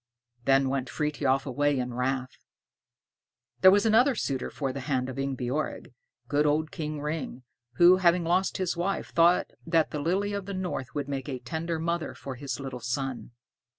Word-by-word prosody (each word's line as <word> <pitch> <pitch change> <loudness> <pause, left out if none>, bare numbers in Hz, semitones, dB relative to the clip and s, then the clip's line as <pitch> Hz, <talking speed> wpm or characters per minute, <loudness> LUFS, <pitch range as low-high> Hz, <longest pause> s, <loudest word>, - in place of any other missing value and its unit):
Then 135 0 +4
went 130 -1 -2
Frithiof 145 -3 0
away 145 +1 +1
in 125 -1 -2
wrath. 130 +1 -2 1.2
There 185 - +8
was 205 +2 +4
another 240 +5 +4
suitor 135 -10 -2
for 135 -3 -3
the 140 - -5
hand 130 -1 -1
of 130 - -6
Ingebjorg, 135 +1 -3 0.3
good 150 +1 +2
old 155 +2 +1
King 150 -1 -4
Ring, 150 -4 -4 0.3
who, 175 +1 +7
having 175 -1 +3
lost 180 +3 +1
his 185 -2 -1
wife, 180 +3 -2
thought 170 +1 +4
that 165 -1 +2
the 150 - -3
Lily 195 +6 0
of 200 -1 -4
the 200 - -4
North 180 -8 -4
would 145 -2 -2
make 140 0 -4
a 130 - -3
tender 160 +7 -3
mother 170 0 -2
for 135 - -7
his 130 0 -5
little 135 -2 -6
son. 120 -1 -3
145 Hz, 175 wpm, -28 LUFS, 130-170 Hz, 1.2 s, There